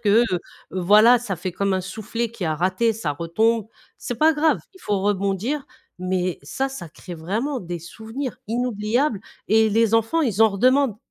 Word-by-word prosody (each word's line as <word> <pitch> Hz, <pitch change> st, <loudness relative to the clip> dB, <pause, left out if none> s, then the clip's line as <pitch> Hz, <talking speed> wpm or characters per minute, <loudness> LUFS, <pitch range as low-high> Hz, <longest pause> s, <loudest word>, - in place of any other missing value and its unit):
que, 215 Hz, +3 st, +4 dB
heu, 180 Hz, -, +2 dB, 0.3 s
voilà, 210 Hz, +7 st, +6 dB
ça 220 Hz, -5 st, -4 dB
fait 185 Hz, +3 st, -4 dB
comme 200 Hz, +2 st, 0 dB
un 185 Hz, -, 0 dB
soufflé 220 Hz, +4 st, -4 dB
qui 225 Hz, -6 st, -6 dB
a 155 Hz, -, 0 dB
raté, 185 Hz, +8 st, +1 dB
ça 175 Hz, -9 st, -3 dB
retombe. 215 Hz, +8 st, +1 dB, 0.3 s
C'est 245 Hz, -, -4 dB
pas 315 Hz, +1 st, +5 dB
grave, 310 Hz, +1 st, +2 dB
il 375 Hz, -, -17 dB
faut 205 Hz, -2 st, -1 dB
rebondir 205 Hz, +8 st, -1 dB, 0.3 s
mais 185 Hz, -1 st, -1 dB
ça, 265 Hz, -, -2 dB
ça 270 Hz, -11 st, -8 dB
crée 175 Hz, +3 st, -10 dB
vraiment 220 Hz, -, -2 dB
des 175 Hz, -1 st, -5 dB
souvenirs 230 Hz, -, -6 dB
inoubliables 235 Hz, 0 st, 0 dB, 0.3 s
et 220 Hz, +1 st, +5 dB
les 225 Hz, +1 st, +2 dB
enfants, 225 Hz, +9 st, +2 dB
ils 220 Hz, -6 st, -1 dB
en 220 Hz, -, +7 dB
redemandent. 255 Hz, +3 st, +3 dB
215 Hz, 180 wpm, -23 LUFS, 185-245 Hz, 0.3 s, en